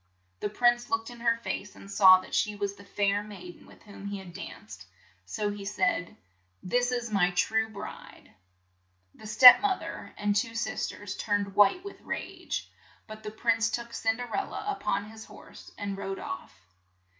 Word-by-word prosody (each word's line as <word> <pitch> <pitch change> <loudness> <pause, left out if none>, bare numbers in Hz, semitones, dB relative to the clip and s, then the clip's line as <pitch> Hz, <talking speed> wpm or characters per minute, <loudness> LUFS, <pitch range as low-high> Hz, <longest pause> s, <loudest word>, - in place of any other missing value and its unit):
The - - -2
prince 240 +2 +2
looked 225 +1 -1
in 240 - -12
her 230 0 +2
face, 205 -3 -5
and 195 - -12
saw 190 -2 +8
that - - -13
she 210 -1 +1
was 200 -1 -2
the 200 - -15
fair 200 0 0
maid 185 -4 -10
en - - -18
with - - -18
whom 200 -1 -10
he 200 0 -4
had 190 -3 -10
danced, 195 - -10 0.4
so 210 -2 -2
he 205 -1 -7
said: 185 -3 -1
' 90 +1 -41
' 95 - -42
This 245 0 +2
is 240 -2 -2
my 190 -4 +3
true 220 +5 +1
bride! 220 - -10 0.3
' 95 0 -43
' 95 0 -43
The 215 - -9
step 250 - +10
moth 400 -2 0
er - - -8
and 205 0 0
two 230 +2 0
sis 230 - -2
ters 205 -1 -7
turned 205 -2 -1
white 210 - +4
with 400 - -9
rage, - - -5 0.4
but 215 -1 -10
the 215 - -6
prince 225 +1 +1
took 235 +1 -4
Cin 225 0 0
der 245 0 -5
el 395 - -1
la 415 - -4
up 400 - -8
on 200 +1 +1
his 220 0 -11
horse - - -14
and 200 -1 -4
rode 195 0 -5
off. 110 -4 -7
205 Hz, 205 wpm, -28 LUFS, 195-230 Hz, 0.4 s, step